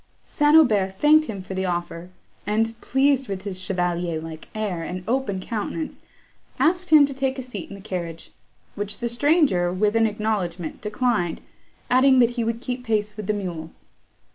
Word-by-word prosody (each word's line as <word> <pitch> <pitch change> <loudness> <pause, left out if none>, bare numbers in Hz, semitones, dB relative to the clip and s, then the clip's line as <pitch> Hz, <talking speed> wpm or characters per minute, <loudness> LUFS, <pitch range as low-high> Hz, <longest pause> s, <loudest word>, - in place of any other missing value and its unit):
St. 295 +1 +2
Aubert 205 -10 +4
thanked 310 +1 +5
him 200 -4 -5
for 190 - -7
the 190 0 -1
offer, 175 0 -4 0.4
and, 225 +2 +1
pleased 270 0 +2
with 190 -1 -5
his 190 -3 -4
chevalier 175 -3 -1
like 160 0 -9
air 205 -6 -2
and 180 +2 -5
open 240 -5 0
countenance, 230 - -4 0.6
asked 355 +6 +2
him 305 -2 +8
to 280 - -4
take 265 0 -1
a 260 - -4
seat 215 -8 -7
in 200 - -8
the 200 - -11
carriage; 170 -4 -6 0.4
which 205 0 -3
the 240 - -2
stranger, 240 - +2
with 205 +4 +1
an 225 0 +4
acknowledgment, 200 -6 -3
declined, 210 -5 0 0.5
adding 260 +1 +5
that 240 -1 +5
he 240 -1 -2
would 230 +1 -2
keep 250 -1 -4
pace 210 -3 -1
with 215 -3 -6
the 215 - +2
mules. 170 -5 -6
210 Hz, 175 wpm, -23 LUFS, 185-255 Hz, 0.6 s, him